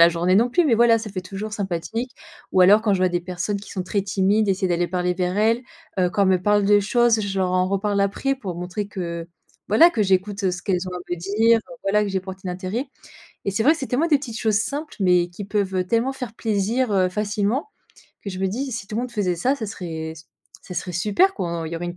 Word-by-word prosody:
la 170 - +9
journée 170 +2 +1
non 235 +5 +4
plus, 350 +7 +3
mais 260 -7 +4
voilà 230 0 +5
ça 220 -1 -7
fait 190 -1 -4
toujours 195 +3 -6
sympathique». 205 +5 -3 0.4
Ou 185 - +4
alors 200 +4 +7
quand 215 -2 +2
je 195 - +2
vois 185 0 +3
des 175 0 -1
personnes 180 +3 -3
qui 205 - -12
sont 185 -2 -4
très 200 +2 -1
timides, 200 +2 +1
essayer 190 0 +1
d'aller 175 0 0
parler 180 0 0
vers 180 +1 -1
elles, 225 +3 +2 0.4
heu, 180 -1 +2
quand 200 - +1
elles 195 - +3
me 185 -1 +2
parlent 205 +1 +3
des 205 +1 +5
choses, 230 +2 +3
je 195 -2 -3
leur 185 -1 +1
en 185 0 +2
reparle 200 +1 0
après 200 +8 0
pour 195 -10 -6
montrer 180 +4 -4
que, 170 -3 -5 0.4
voilà, 325 - +7
que 225 - 0
j'écoute, 195 +1 0
heu, 185 - +3
ce 180 0 -5
qu'elles 185 -1 -1
ont - - -5
à - - -4
me 175 - -1
dire, 215 +6 +3
heu, 255 +3 -12
voilà 210 +2 +3
que 210 - -1
j'y 195 -1 0
porte 190 0 -9
un - - -3
intérêt. 185 +9 -3 0.6
Et - - 0
c'est 210 +3 0
vrai 300 - +7
que 330 - -4
c'est 265 - -5
tellement 275 +7 +1
des 310 -3 +4
petites 240 -5 -6
choses 220 -3 +1
simples, 285 +7 -4
mais 180 -2 +3
qui 175 +4 -8
peuvent, 200 -1 -1
heu, 185 - +1
tellement 235 +6 +1
faire 250 -4 -7
plaisir 225 +2 0
heu, 185 -2 +3
facilement. 210 - -1 0.5
Que 200 - -5
je 185 - -6
me 190 - 0
dis, 260 +8 -3
si 215 -4 -5
tout 210 - -7
le - - +1
monde 250 - -5
faisait 185 -5 0
ça, 260 +10 +1
ça 225 - -4
serait, 160 -5 -6
ç 160 0 -14 0.4
ça 180 - -9
serait 180 - -4
super 215 - +2
quoi. 170 -2 -3
On - - -5
il 160 - -6
y - - -2
aurait 175 +1 -4
une 175 - -6
200 Hz, 270 wpm, -23 LUFS, 180-225 Hz, 0.6 s, la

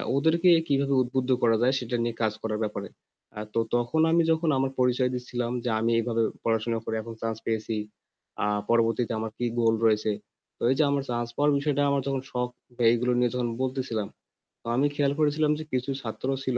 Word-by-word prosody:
ওদেরকে 160 +5 +3
অ্যা 165 - +3
কিভাবে 140 -1 +1
উদ্বুদ্ধ 125 +1 -1
করা 115 -1 +5
যায় 130 +2 +3
সেটা 120 0 -3
নিয়ে 120 -1 -2
কাজ 110 -1 +1
করার 110 -1 -2
ব্যাপারে। 100 -1 -4 0.5
আ - - -4
তো 115 - +1 0.2
তখন 120 +7 +1
আমি 170 0 +4
যখন 160 0 +1
আমার 135 0 0
পরিচয় 125 0 +2
দিচ্ছিলাম 125 -1 -3
যে, 125 - -1
আমি 115 +1 +1
এইভাবে 115 0 0 0.2
পড়াশোনা 115 0 0
করে 110 - -2
এখন 115 +1 -8
chance 115 -1 -2
পেয়েছি, 110 0 -1 0.7
আ - - +1 0.2
পরবর্তীতে 115 0 +2
আমার 110 0 -4
কি 120 - -1
goal 115 -1 +3
রয়েছে। 110 0 +3 0.5
তো - - -33
এই - - +2
যে - - +6
আমার 140 -1 0
chance 120 0 -2
পাওয়ার 145 +1 +3
বিষয়টা 145 0 0
আমার 140 - +1
তখন 135 -1 -1
শখ, 125 0 -1 0.4
এইগুলো 125 +1 +1
নিয়ে 125 -1 +2
যখন 120 -1 0
বলতেছিলাম, 130 -5 -2 0.5
তো - - -13
আমি 140 +4 +3
খেয়াল 140 -1 +2
করেছিলাম 150 0 +2
যে - - -4
কিছু 130 +2 -1
ছাত্র 120 +2 -5 0.2
ছিল 130 -2 0
125 Hz, 200 wpm, -27 LUFS, 115-140 Hz, 0.7 s, যে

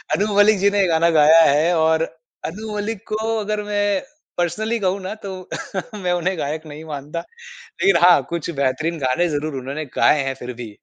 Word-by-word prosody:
अनु 205 +2 0
मलिक 205 0 +5
जी 200 +1 +4
ने 205 - +1
ये 190 - +3
गाना 165 0 +3
गाया 155 +2 +7
है। 155 +3 +4
और 160 0 +3 0.5
अनु 215 +4 -7
मलिक 205 0 -3
को 215 0 -2 0.2
अगर 210 0 -2
मैं 205 0 -1 0.5
पर्सनली 220 +7 -1
कहूँ 190 0 0
ना, 190 +3 -5
तो 190 -4 -8 0.5
मैं 180 - +1
उन्हें 185 +1 -1
गायक 155 +3 -3
नहीं 150 +1 -9
मानता। 145 +4 -5 0.4
लेकिन 435 - +1
हाँ, 180 -1 +7
कुछ 170 -1 -2
बेहतरीन 155 +5 0
गाने 170 +7 +1
ज़रूर 150 0 -3
उन्होंने 140 +4 -5
गाए 150 -2 +4
हैं 135 0 -2
फिर 125 +1 -5
भी। 115 - -7
175 Hz, 190 wpm, -21 LUFS, 155-205 Hz, 0.5 s, गाया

